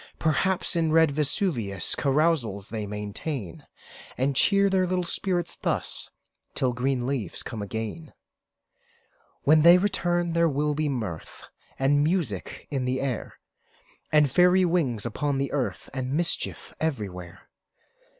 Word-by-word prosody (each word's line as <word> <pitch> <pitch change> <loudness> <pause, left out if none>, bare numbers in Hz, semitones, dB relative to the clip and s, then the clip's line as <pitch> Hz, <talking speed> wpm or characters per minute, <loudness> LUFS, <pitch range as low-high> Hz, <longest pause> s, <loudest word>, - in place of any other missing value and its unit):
Perhaps, 175 +5 +1
in 165 -2 +1
red 160 -1 +5
Vesuvius 140 - 0
Carousals 135 -9 +1
they 110 -2 -4
maintain; 105 - -5 0.5
And 135 +2 0
cheer 200 +7 +4
their 190 -1 +2
little 180 0 0
spirits 175 0 -2
thus, - - 0 0.5
Till 130 -2 +1
green 125 0 -1
leaves 125 -9 -3
come 115 -4 -6
again. 110 +9 -5 1.3
When 155 +2 +5
they 170 +3 +8
return, 175 -3 0
there 170 0 +3
will 150 +1 0
be 150 0 -1
mirth 110 - -5 0.3
And 145 +2 +3
music 150 - -2
in 135 -3 -1
the 130 +1 -1
air, 130 -4 -4 0.7
And 150 -3 +4
fairy 180 +4 +5
wings 140 -11 0
upon 140 +4 -1
the 140 0 -2
earth, 140 -3 -2
And 130 0 -3
mischief 170 +2 -2
everywhere. 95 - -4
145 Hz, 130 wpm, -26 LUFS, 120-170 Hz, 1.3 s, they